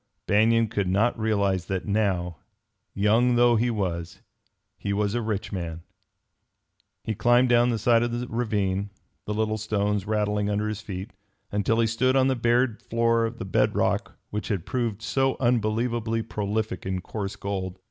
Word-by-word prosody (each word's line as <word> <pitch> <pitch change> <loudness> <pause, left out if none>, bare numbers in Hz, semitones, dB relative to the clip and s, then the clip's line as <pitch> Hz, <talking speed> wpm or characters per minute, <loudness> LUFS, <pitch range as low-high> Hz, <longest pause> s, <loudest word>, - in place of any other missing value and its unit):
Banion 115 +3 +3
could 100 -2 -1
not 105 +6 +1
realize 100 -5 +1
that 95 -1 -2
now, 95 -5 0 0.6
young 115 +5 +3
though 120 0 +5
he 120 +2 +2
was, 90 -6 -3 0.6
he 100 - -2
was 105 0 0
a 120 - 0
rich 110 -2 -3
man. 85 -4 -5 1.2
He 110 - -2
climbed 120 +4 +3
down 120 0 +4
the 115 - 0
side 115 +2 +3
of 120 0 0
the 120 +1 -2
ravine, 100 -4 -1 0.4
the 105 - -2
little 110 0 0
stones 105 -1 -1
rattling 105 -1 0
under 105 +1 0
his 105 0 -4
feet, 100 0 -6 0.4
until 105 +3 +1
he 115 - +4
stood 125 +4 +1
on 135 0 +4
the 130 - +1
bared 120 0 +1
floor 115 -1 +1
of 115 +1 -8
the - - -5
bed 95 - +1
rock - - 0
which 105 0 -3
had 100 -7 -2
proved 115 -4 -2
so 135 +2 +1
unbelievably 115 -1 0
prolific 105 -2 -3
in 95 -1 -2
coarse 100 +1 -5
gold. 95 -2 -4
110 Hz, 170 wpm, -26 LUFS, 100-115 Hz, 1.2 s, though